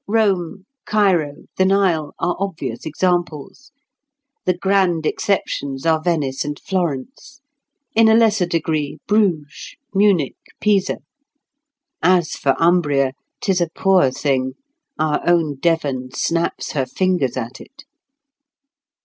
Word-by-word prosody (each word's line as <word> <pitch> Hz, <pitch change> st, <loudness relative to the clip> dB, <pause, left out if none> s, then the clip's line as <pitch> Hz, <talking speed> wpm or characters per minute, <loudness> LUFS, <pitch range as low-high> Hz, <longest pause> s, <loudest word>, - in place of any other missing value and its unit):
Rome, 195 Hz, -4 st, 0 dB, 0.2 s
Cairo, 180 Hz, -9 st, +1 dB
the 185 Hz, -, +3 dB
Nile, 190 Hz, -6 st, +1 dB
are 175 Hz, -, -1 dB
obvious 195 Hz, -5 st, -4 dB
examples; 175 Hz, -, -2 dB, 0.7 s
the 180 Hz, -1 st, +1 dB
grand 185 Hz, -4 st, +1 dB
exceptions 140 Hz, -8 st, -1 dB
are 160 Hz, -1 st, +3 dB
Venice 150 Hz, -6 st, -1 dB
and 145 Hz, 0 st, -5 dB
Florence—in 245 Hz, -, -3 dB
a 220 Hz, -, +6 dB
lesser 215 Hz, -5 st, +3 dB
degree, 155 Hz, -3 st, -1 dB
Bruges, 190 Hz, -9 st, 0 dB, 0.2 s
Munich, 195 Hz, -8 st, +2 dB, 0.2 s
Pisa. 200 Hz, -3 st, +1 dB, 1.0 s
As 175 Hz, -1 st, +3 dB
for 135 Hz, -1 st, 0 dB
Umbria, 145 Hz, -6 st, +2 dB, 0.3 s
'tis 190 Hz, -3 st, +1 dB
a 170 Hz, -, +1 dB
poor 185 Hz, -4 st, +3 dB
thing; 130 Hz, -1 st, -1 dB, 0.4 s
our 155 Hz, -1 st, 0 dB
own 160 Hz, -5 st, +2 dB
Devon 140 Hz, -5 st, 0 dB
snaps 170 Hz, 0 st, -1 dB
her 135 Hz, -4 st, -1 dB
fingers 180 Hz, -10 st, 0 dB
at 120 Hz, +1 st, -5 dB
it. 275 Hz, +1 st, -15 dB
175 Hz, 110 wpm, -20 LUFS, 145-195 Hz, 1.0 s, a